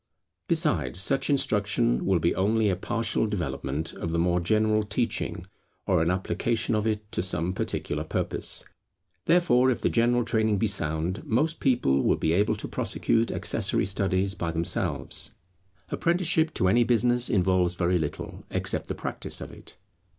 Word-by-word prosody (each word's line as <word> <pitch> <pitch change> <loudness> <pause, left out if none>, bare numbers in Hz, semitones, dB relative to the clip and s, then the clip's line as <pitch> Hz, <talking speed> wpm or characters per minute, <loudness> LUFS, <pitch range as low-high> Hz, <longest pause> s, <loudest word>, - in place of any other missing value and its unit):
Besides - - 0
such 135 +10 0
instruction 105 - +1
will 95 -2 +3
be 85 +1 +1
only 105 +2 +2
a 95 - +1
partial 115 +3 -1
development 80 -6 -3
of 85 - -5
the 85 - -1
more 90 +1 +2
general 110 +4 +2
teaching, 105 -3 -2 0.4
or - - +2
an 85 - +1
application 110 +5 -1
of 105 0 0
it 105 -1 -3
to - - -1
some 90 -1 -1
particular 75 -4 -3
purpose. 80 - -2 0.6
Therefore 130 -8 +4
if 120 -3 -1
the - - +1
general 120 0 +2
training 110 -3 +1
be 105 - +1
sound, 85 -1 -1
most 150 +9 0
people 70 - +2
will - - +3
be 80 - 0
able 100 +4 +2
to - - -6
prosecute 115 0 0
accessory - - -1
studies 95 0 0
by 85 -4 -3
themselves. 80 0 -2 0.5
Apprenticeship 170 -2 +1
to 95 - +2
any 120 +6 +4
business 120 +1 +2
involves 90 -2 +2
very 90 0 +1
little, 75 -2 -5
except - - -1
the - - -3
practice - - -4
of - - -8
it. - - -12
105 Hz, 160 wpm, -26 LUFS, 90-115 Hz, 0.6 s, Therefore